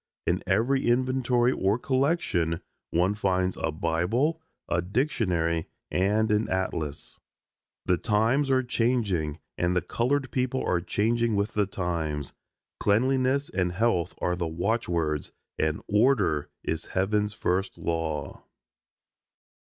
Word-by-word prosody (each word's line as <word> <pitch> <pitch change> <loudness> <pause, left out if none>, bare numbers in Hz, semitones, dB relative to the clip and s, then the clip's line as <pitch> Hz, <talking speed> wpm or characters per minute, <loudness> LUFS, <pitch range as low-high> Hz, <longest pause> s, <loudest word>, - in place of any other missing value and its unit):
In 90 +2 +1
every 120 +9 +2
inventory 125 0 +2
or 100 -2 +1
collection 130 - 0 0.3
one 90 +4 +2
finds 95 -3 0
a 80 - 0
Bible, 90 - 0 0.3
a 85 - +1
dictionary, 90 - 0 0.2
and 105 +4 +2
an 105 +1 +1
atlas. 80 -6 -3 0.7
The 90 -1 +3
times 115 +7 +2
are 130 -1 +3
changing 110 - 0 0.2
and 90 +1 +1
the 90 - +3
colored 130 +2 0
people 130 0 -1
are 90 - +1
changing 115 +5 +1
with 100 +2 0
the 105 -2 +1
times. 80 -7 -3 0.5
Cleanliness 130 +6 +2
and 90 -2 0
health 95 -4 +1
are 90 - 0
the 85 -1 -2
watchwords, 85 -4 -1 0.3
and 80 0 0
"Order" 105 - +2
is 80 0 -2
Heaven's 105 +2 +1
first 95 +1 -1
law. 80 -4 -3
100 Hz, 120 wpm, -27 LUFS, 85-120 Hz, 0.7 s, The